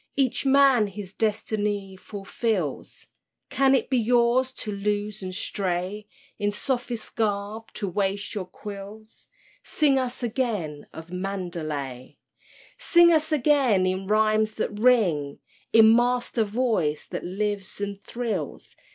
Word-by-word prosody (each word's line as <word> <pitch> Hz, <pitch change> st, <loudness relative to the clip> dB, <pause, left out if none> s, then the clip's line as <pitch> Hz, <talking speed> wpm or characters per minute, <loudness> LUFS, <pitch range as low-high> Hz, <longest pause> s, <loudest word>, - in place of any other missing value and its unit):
Each 270 Hz, 0 st, +1 dB
man 270 Hz, -5 st, +5 dB
his 195 Hz, -1 st, -8 dB
destiny 205 Hz, -2 st, -1 dB
fulfills; 195 Hz, -, -3 dB, 0.5 s
Can 270 Hz, 0 st, +4 dB
it -, -, 0 dB
be 255 Hz, -2 st, +2 dB
yours 240 Hz, +2 st, +3 dB
to 215 Hz, -, -5 dB
loose 205 Hz, +1 st, -2 dB
and 185 Hz, -1 st, -5 dB
stray; 190 Hz, +2 st, -3 dB, 0.3 s
In 205 Hz, -, +1 dB
sophist 240 Hz, +1 st, -3 dB
garb 210 Hz, +1 st, -2 dB
to 200 Hz, -, -3 dB
waste 200 Hz, +2 st, -2 dB
your 200 Hz, -4 st, -3 dB
quills?— 205 Hz, +3 st, -10 dB, 0.3 s
Sing 280 Hz, -3 st, +2 dB
us 255 Hz, -1 st, -3 dB
again 215 Hz, -, -2 dB
of 165 Hz, +2 st, -10 dB
Mandalay! 165 Hz, -9 st, -4 dB, 0.6 s
Sing 345 Hz, -1 st, +6 dB
us 315 Hz, 0 st, +1 dB
again 270 Hz, -9 st, +3 dB
in 185 Hz, +1 st, -1 dB
rhymes 215 Hz, +1 st, +2 dB
that 210 Hz, -1 st, -3 dB
ring, 185 Hz, -, +3 dB, 0.3 s
In 225 Hz, 0 st, +7 dB
Master 240 Hz, -1 st, +1 dB
Voice 205 Hz, -9 st, 0 dB
that -, -, -6 dB
lives 200 Hz, +2 st, -3 dB
and 200 Hz, -1 st, -4 dB
thrills. 235 Hz, -2 st, -4 dB
210 Hz, 125 wpm, -25 LUFS, 195-240 Hz, 0.6 s, In